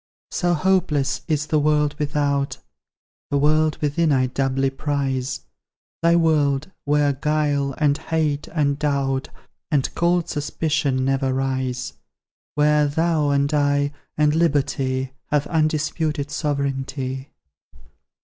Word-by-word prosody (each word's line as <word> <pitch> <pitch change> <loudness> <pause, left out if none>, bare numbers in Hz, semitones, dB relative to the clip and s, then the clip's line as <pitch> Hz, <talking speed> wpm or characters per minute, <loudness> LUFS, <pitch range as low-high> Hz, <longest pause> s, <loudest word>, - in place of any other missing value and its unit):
So 175 -1 +1
hopeless 150 -6 +1
is 150 -2 0
the 155 0 +1
world 150 0 +2
without; 145 -1 0 0.7
The 145 - +1
world 155 +2 +2
within 150 +2 +1
I 130 -2 +3
doubly 135 +1 0
prize; 135 -2 -2 0.6
Thy 170 0 +4
world, 155 -2 +2
where 145 0 +2
guile, 145 -1 0
and 150 -2 +2
hate, 155 -3 -1
and 145 -3 0
doubt, 140 -3 0 0.4
And 145 -5 0
cold 175 0 +1
suspicion 145 -3 -1
never 135 0 +1
rise; 130 - -2 0.6
Where 150 0 +3
thou, 160 0 +1
and 140 +1 +1
I, 145 0 +2 0.2
and 150 0 +3
Liberty, 135 -5 0 0.2
Have 145 -1 +1
undisputed 155 -2 0
sovereignty. 135 -3 -2
145 Hz, 110 wpm, -22 LUFS, 135-155 Hz, 0.7 s, Thy